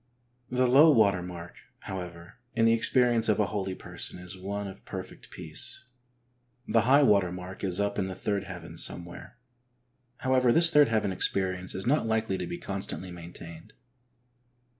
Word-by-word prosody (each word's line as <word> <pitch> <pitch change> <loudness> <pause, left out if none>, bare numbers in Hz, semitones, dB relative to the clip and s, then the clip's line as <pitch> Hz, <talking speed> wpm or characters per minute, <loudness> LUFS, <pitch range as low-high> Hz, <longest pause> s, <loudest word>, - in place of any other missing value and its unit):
The 125 +1 +1
low 140 +6 +7
water 105 -9 +4
mark, 90 -1 -9 0.2
however, 90 +1 -8 0.2
in 115 -1 +3
the 115 - +5
ex 115 - +3
perience 120 -3 +3
of 105 - +2
a 105 - +3
holy 95 -2 -3
person - - -7
is 90 +1 -7
one 100 +2 -5
of 95 +1 -11
perfect 95 -2 -9
peace - - -3 0.4
— 125 0 -42
the 115 +1 +3
high 140 +2 +6
water 100 -8 +3
mark 90 +2 -8
is 95 -1 -1
up 100 0 -1
in 95 - -1
the 95 - -5
third 100 0 -2
heaven 90 -3 -9
somewhere; 90 +5 -4 0.8
however, 130 -2 +3
this 165 +4 +5
third 150 -3 +6
heaven 110 -3 0
experience 95 0 0
is 95 - -2
not 135 -1 +2
likely 110 -3 -1
to - - -4
be 175 - -5
constantly 95 - -4
maintained. 85 -1 -11
100 Hz, 170 wpm, -28 LUFS, 90-120 Hz, 0.8 s, low